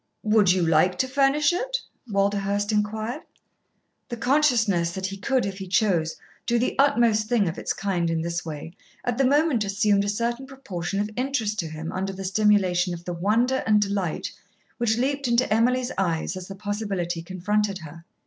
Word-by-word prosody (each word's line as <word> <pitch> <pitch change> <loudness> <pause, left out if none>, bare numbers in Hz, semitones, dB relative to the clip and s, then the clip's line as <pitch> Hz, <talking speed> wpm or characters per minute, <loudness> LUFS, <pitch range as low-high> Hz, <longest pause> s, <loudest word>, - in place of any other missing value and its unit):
"Would 210 -3 +4
you 180 -2 +2
like 165 +3 +3
to 260 - +1
furnish 280 +4 +3
it?" - - -1 0.3
Walderhurst 200 +1 0
inquired. 215 +6 -1 0.9
The 240 - -4
consciousness 230 - +2
that 190 -1 -4
he 195 +1 -3
could, 250 +6 0
if 195 0 -5
he 190 - -6
chose, 180 -5 +1 0.3
do 235 - +2
the 245 - 0
utmost 235 -6 +3
thing 230 -6 +2
of 165 - -3
its - - -2
kind 180 -4 -1
in 165 -1 -1
this 170 +1 -3
way, 160 0 -7 0.3
at 245 +1 -1
the 270 - +4
moment 290 -4 +3
assumed 200 0 +2
a 200 - -1
certain 235 +5 -2
proportion 195 -9 -5
of 210 +1 -2
interest 245 -5 -1
to 165 - -1
him 160 +1 -6
under 195 +1 -3
the 190 0 -6
stimulation 185 -3 +2
of 170 0 -12
the 175 - -3
wonder 225 +9 +1
and 210 -1 +5
delight 195 -5 -2 0.5
which 225 -2 +1
leaped 275 +2 0
into 235 -1 +2
Emily's 245 +3 +2
eyes 170 -1 -1
as 185 -1 -7
the 195 - -8
possibility 195 -4 -3
confronted 195 +3 -1
her. 160 +1 -11
205 Hz, 180 wpm, -25 LUFS, 185-240 Hz, 0.9 s, and